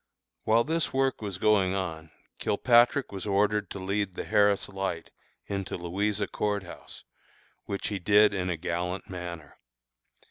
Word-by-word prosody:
While 115 +2 +4
this 160 +3 -1
work 135 -2 0
was 100 -4 -4
going 95 -2 +3
on, 80 -4 -4 0.3
Kilpatrick 120 +5 +3
was 100 0 -6
ordered 105 0 +1
to - - -6
lead 100 0 -2
the - - -4
Harris 100 -1 +3
Light 95 -4 -4 0.3
into 100 -1 -4
Louisa 100 +4 -1
Court 105 0 -2
House, 90 - -11 0.6
which 100 -1 -3
he 100 -2 -3
did 105 +3 +5
in 90 -2 -1
a 85 - -1
gallant 90 +3 -3
manner. 85 -4 -7
100 Hz, 145 wpm, -28 LUFS, 90-105 Hz, 0.6 s, did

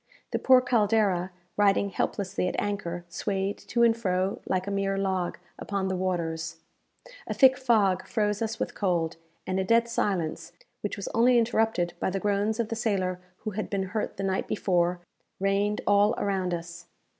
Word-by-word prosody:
The - - 0
poor 260 -1 +6
"Caldera," 210 -6 +2 0.3
riding 200 -1 +3
helplessly 195 -1 -1
at - - -2
anchor, 175 -4 -3
swayed 195 +3 -2
to 235 0 0
and 230 -1 +5
fro 190 -3 -1
like 185 0 0
a 200 - -3
mere 195 0 0
log 190 -2 -1 0.2
upon 195 -2 -2
the 190 - -1
waters. 170 -3 -2 0.7
A - - -3
thick 265 -1 +7
fog 220 -7 +2
froze 210 -1 0
us 225 0 -2
with - - -2
cold, 170 -5 0 0.3
and 185 0 -1
a - - +1
dead 230 +4 +3
silence, 180 -7 -2 0.3
which 205 - -3
was 200 - -5
only 240 +2 +4
interrupted 225 -6 +1
by - - 0
the 195 +1 -2
groans 205 +2 0
of 225 -2 0
the 225 - -2
sailor 190 -5 -1 0.2
who 215 - -2
had 215 +2 -4
been 190 -2 -2
hurt 215 - -2
the 195 - -3
night 190 -1 -1
before, 175 -3 +1 0.4
reigned 200 +2 +1
all 205 +3 +4
around 190 -2 -1
us. 170 0 -6
195 Hz, 175 wpm, -27 LUFS, 185-215 Hz, 0.7 s, thick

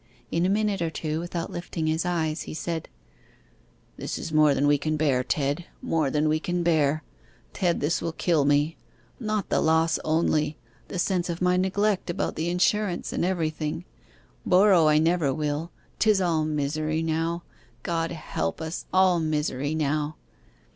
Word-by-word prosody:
In 170 +2 +2
a - - +1
minute 205 -2 +1
or 165 - 0
two, 155 -1 -3
without 170 0 -4
lifting 175 -2 -4
his 160 +2 0
eyes, 160 -2 -1
he - - -6
said 165 0 -4 1.1
'This - - -4
is 160 - -6
more 155 -2 +5
than 140 - +1
we 145 0 +4
can 155 +2 -1
bear, 140 -5 +2
Ted 145 +5 -1
more 155 -4 0
than 150 +2 +1
we 155 +1 +2
can 175 +1 -1
bear! 155 -2 +2 0.5
Ted, 175 -3 0
this 150 +4 0
will 165 - -2
kill 160 -2 +1
me. 145 +3 +2 0.4
Not 215 -4 -2
the - - +2
loss 160 0 +3
only 155 -1 +1 0.3
the - - -5
sense 180 0 0
of 170 0 -3
my 180 0 +3
neglect 190 +1 +1
about 175 - -2
the 165 +2 -1
insurance 180 +1 0
and - - -1
everything. 160 -2 -2 0.6
Borrow 185 -3 +5
I 150 0 +5
never 160 -2 +2
will. 150 +2 -2 0.3
'Tis 215 -3 +4
all 165 -4 +1
misery 155 +1 -1
now. 165 +2 -1 0.4
God 165 -1 -1
help 155 - -3
us 160 +1 -5
all 185 -2 +4
misery 150 -2 -1
now! 150 0 -1
160 Hz, 165 wpm, -26 LUFS, 155-175 Hz, 1.1 s, more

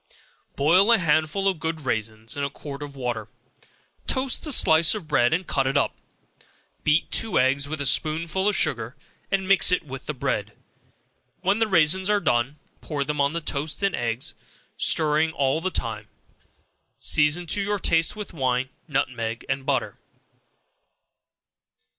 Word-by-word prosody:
Boil 180 +10 +4
a 230 - +7
handful 160 +2 +1
of 190 -4 0
good 160 0 -3
raisins 110 -3 -3
in 140 - -3
a 140 - -1
quart 140 0 -9
of 145 -1 -8
water; 120 -5 -3 0.8
toast 260 +3 -1
a - - -3
slice 160 - +5
of 195 -7 -7
bread 135 -5 +3
and 180 +3 0
cut 135 -4 0
it 135 +2 +1
up; 140 - +1 0.9
beat 150 +2 +2
two 225 - +1
eggs 135 +2 +2
with 155 +1 -5
a 140 - -2
spoonful 165 +7 +1
of 205 - 0
sugar, 120 -8 -1 0.3
and 195 -1 0
mix 195 -1 +5
it 180 - +1
with 135 -2 -9
the 150 - -2
bread; 105 -6 -2 0.9
when 195 +3 +1
the 225 - +2
raisins 190 +1 +3
are 210 -1 +3
done, 120 -3 0 0.2
pour 145 -3 -2
them 150 0 -2
on 140 +2 +1
the 170 - -2
toast 150 +3 -4
and 195 - +1
eggs, 120 +1 -3 0.4
stirring 155 0 +2
all 140 +1 0
the 185 - -1
time; 110 - -4 0.9
season 150 +4 +3
to 200 +4 0
your 205 +1 -1
taste 165 -2 +1
with 210 -3 -7
wine, 130 -3 0 0.2
nutmeg 115 -6 -2
and 135 0 -3
butter. 135 -4 -1
150 Hz, 160 wpm, -24 LUFS, 130-180 Hz, 0.9 s, a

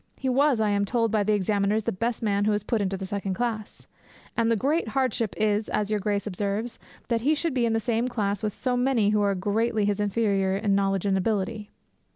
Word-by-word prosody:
He 265 - -2
was, 270 -1 +3
I 215 -1 +2
am 200 0 +1
told 230 +2 0
by 215 -1 +2
the 210 +1 +1
examiners, 205 +2 +1
the - - -1
best 230 +5 -2
man 205 -1 +1
who 215 - +3
was 210 -1 0
put 220 0 0
into 195 -1 -1
the 190 - -5
second 195 -1 -3
class; 225 -2 -4 0.5
and 230 -1 +2
the 230 - +3
great 285 +6 0
hardship 230 -3 -1
is, 210 0 +1
as 210 0 -1
your 210 - +1
Grace 205 0 -1
observes, 205 +3 -3 0.3
that 230 -2 +1
he 295 +6 +3
should 325 0 -1
be 245 -2 +1
in 225 - 0
the 225 - +2
same 230 +2 0
class 205 -5 -1
with 210 -2 -2
so 255 -1 -1
many 245 -5 +2
who 210 -1 +2
are 200 -1 +2
greatly 210 +3 0
his 205 0 0
inferior 200 -2 +1
in 205 -1 +1
knowledge 195 -1 +1
and 195 -1 +2
ability. 210 +1 -2
210 Hz, 230 wpm, -26 LUFS, 200-230 Hz, 0.5 s, was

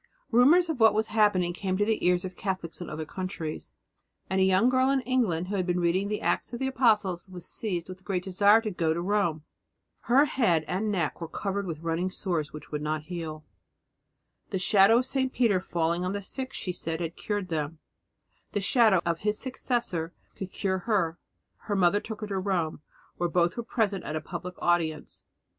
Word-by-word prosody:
Rumours 290 +10 +6
of 320 -6 -3
what 220 -2 +6
was 220 +1 +1
happening 200 -5 +3
came 185 +1 -2
to 205 - +2
the 220 0 0
ears 180 0 +2
of 185 -1 -6
Catholics 185 -3 -4
in 175 - -6
other 155 +1 -5
countries, 175 -2 -5 0.6
and 190 0 +2
a - - +6
young 190 +4 +4
girl 255 +1 +3
in 275 -1 +2
England 225 -10 0
who 205 - -2
had 185 -1 -1
been 180 0 +1
reading 175 +3 +1
the 210 0 -2
Acts - - 0
of 240 - -4
the 265 - -1
Apostles 210 -9 +1
was 180 -2 -9
seized 180 -6 -2
with 185 0 -9
a - - -27
great 185 -1 -2
desire 200 +4 +5
to 215 -2 -3
go 165 -3 0
to - - -2
Rome. 185 -6 0 0.6
Her 270 +5 +5
head 180 - +1
and 210 +4 -1
neck 175 -4 -1
were 165 - -3
covered 200 +3 -3
with 160 -2 -5
running 165 +2 -1
sores 170 -5 -2
which 150 -1 -10
would 150 -1 -3
not 155 0 -2
heal. 155 -2 -6 1.0
The 195 - -1
shadow 195 +4 +5
of 250 - +1
St. 260 0 0
Peter 225 -8 +2
falling 170 -1 -1
on 185 +1 -1
the 200 0 -4
sick, 260 +6 -4
she 180 - -4
said, 165 -2 -3
had 170 -1 -4
cured 205 -3 -3
them; 155 -1 -2 0.8
the 205 - +1
shadow 210 -2 +4
of 170 -1 0
his 210 0 0
successor 240 -10 -2 0.2
would 190 -1 -5
cure 190 -2 -1
her. 180 -5 0 0.5
Her 205 - -1
mother 190 +1 +4
took 220 0 -7
her 215 - -3
to 195 -2 -2
Rome, 180 -6 -1 0.4
where 175 0 0
both 170 0 +2
were 235 - -2
present 215 -4 -1
at 155 - -4
a - - 0
public 180 +2 -6
audience. 165 -3 -1
185 Hz, 205 wpm, -28 LUFS, 170-215 Hz, 1.0 s, Rumours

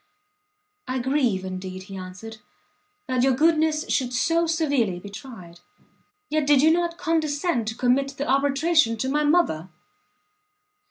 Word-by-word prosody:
"I 255 - -2
grieve, 250 -7 0
indeed," 185 0 -6
he 195 0 -10
answered, 185 +4 -9 0.7
"that 255 -1 0
your 265 0 +3
goodness 310 +1 +2
should 250 -2 -1
so 335 +6 +1
severely 285 - 0
be 200 +2 -10
tried; 190 -7 -11 0.7
yet 305 -1 -1
did 290 -2 +5
you 315 - +6
not 340 0 0
condescend 310 -5 -1
to 220 - -3
commit 270 +2 +1
the 285 - -3
arbitration 275 -2 +2
to 260 +4 -2
my 300 +2 +1
mother?" 290 - +1
270 Hz, 140 wpm, -24 LUFS, 220-310 Hz, 0.7 s, you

